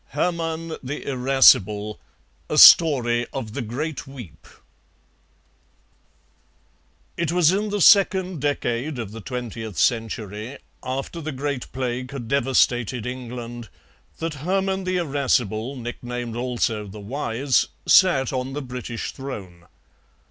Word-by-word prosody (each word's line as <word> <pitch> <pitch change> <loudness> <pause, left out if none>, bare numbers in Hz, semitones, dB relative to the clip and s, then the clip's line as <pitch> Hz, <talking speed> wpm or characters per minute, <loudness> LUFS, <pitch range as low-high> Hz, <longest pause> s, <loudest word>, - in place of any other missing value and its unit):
HERMANN 165 0 -2
THE 135 +3 -6
IRASCIBLE 125 -6 +3 0.5
A - - -1
STORY 120 -7 +7
OF 115 -6 -5
THE 135 - -3
GREAT 140 +7 -4
WEEP 125 - -12 2.7
It 170 -2 -1
was 175 -2 +4
in 210 +3 -1
the 205 -1 -2
second 190 -4 +4
decade 140 -1 -2
of 115 -4 -5
the 115 +1 -9
twentieth 115 -4 -6
century, 110 +1 -1 0.2
after 135 +6 -5
the 155 0 -4
Great 140 -1 -4
Plague 125 -1 -3
had 135 -4 -7
devastated 125 -3 +1
England, 120 -2 -7 0.5
that 165 -1 -3
Hermann 190 +2 -1
the 185 0 0
Irascible, 135 - 0
nicknamed 120 -1 -6
also 120 -3 -2
the 100 +2 -10
Wise, 125 +3 0 0.2
sat 140 -9 +4
on 130 +1 -3
the 145 - -4
British 125 -2 -6
throne. 95 -11 -9
130 Hz, 115 wpm, -23 LUFS, 115-150 Hz, 2.7 s, STORY